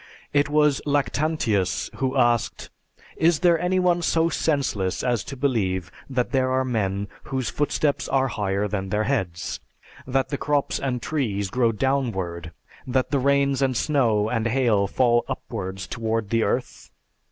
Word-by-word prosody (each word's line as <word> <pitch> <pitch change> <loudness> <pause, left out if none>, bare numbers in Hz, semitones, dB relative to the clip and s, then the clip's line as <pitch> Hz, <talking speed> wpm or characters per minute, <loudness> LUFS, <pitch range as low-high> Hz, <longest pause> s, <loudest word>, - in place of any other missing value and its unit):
It 145 0 +3
was 150 -2 +3
Lactantius 145 - 0
who 130 +1 -1
asked, 120 -2 +1 0.5
"Is 165 -1 +3
there 170 -2 +4
any 180 +2 +1
one 175 -1 +2
so 165 0 +2
senseless 135 - 0
as 120 -3 0
to 135 - -7
believe 95 -9 0 0.2
that 125 -2 -1
there 130 -1 +2
are 130 0 +1
men 100 -5 -1 0.2
whose 130 -3 -2
footsteps 145 0 0
are 135 -1 +2
higher 100 -2 -1
than 95 -2 -3
their 105 +2 +1
heads? 95 -9 -2 0.5
That 135 0 0
the 140 - -3
crops 145 -1 0
and 125 -3 -2
trees 100 -10 -1
grow 120 -2 +2
downward? 100 -10 -1 0.4
That 130 +1 0
the 140 - +2
rains 140 0 +2
and 130 -3 +1
snow 115 -9 +2
and 115 0 0
hail 115 -5 +2
fall 120 +2 +2
upwards 95 +1 -5
toward 110 -2 -2
the 115 0 +2
earth? 120 +4 -2
125 Hz, 150 wpm, -24 LUFS, 105-140 Hz, 0.5 s, there